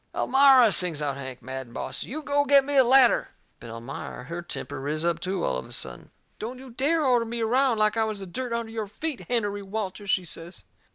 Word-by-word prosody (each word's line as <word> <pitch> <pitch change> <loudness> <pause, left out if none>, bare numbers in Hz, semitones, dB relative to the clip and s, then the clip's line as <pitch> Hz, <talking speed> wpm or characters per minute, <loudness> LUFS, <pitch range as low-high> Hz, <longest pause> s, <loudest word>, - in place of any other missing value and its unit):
"Elmira," 265 -4 +5
sings 180 -5 +4
out 145 -2 -2
Hank, 130 -3 -8
mad 130 +1 -6
and 120 - -16
bossy, - - -4
"you 305 +5 -5
go 285 0 +1
get 280 -1 +5
me 285 0 -2
a 265 - +7
ladder!" 255 0 +5 0.3
But 115 - -10
Elmira, 120 +7 -7
her 170 +1 -6
temper 145 -4 -6
riz 155 +4 -3
up 170 -1 0
too, 185 +1 -3
all - - 0
of 65 - -7
a - - -12
sudden. 60 -2 -2 0.3
"Don't 240 +4 -6
you 260 0 -11
dare 295 +6 +1
order 245 -3 +3
me 230 +1 -5
around 250 +2 +2
like 215 0 +2
I 225 - +2
was 215 -1 -3
the 195 - -7
dirt 245 +7 -5
under 230 -1 -3
your 220 -2 -4
feet, 280 +7 -5
Hennerey 205 -4 -1
Walters," 200 0 -5
she 185 -2 +1
says. 170 +2 -9
215 Hz, 230 wpm, -26 LUFS, 165-255 Hz, 0.3 s, a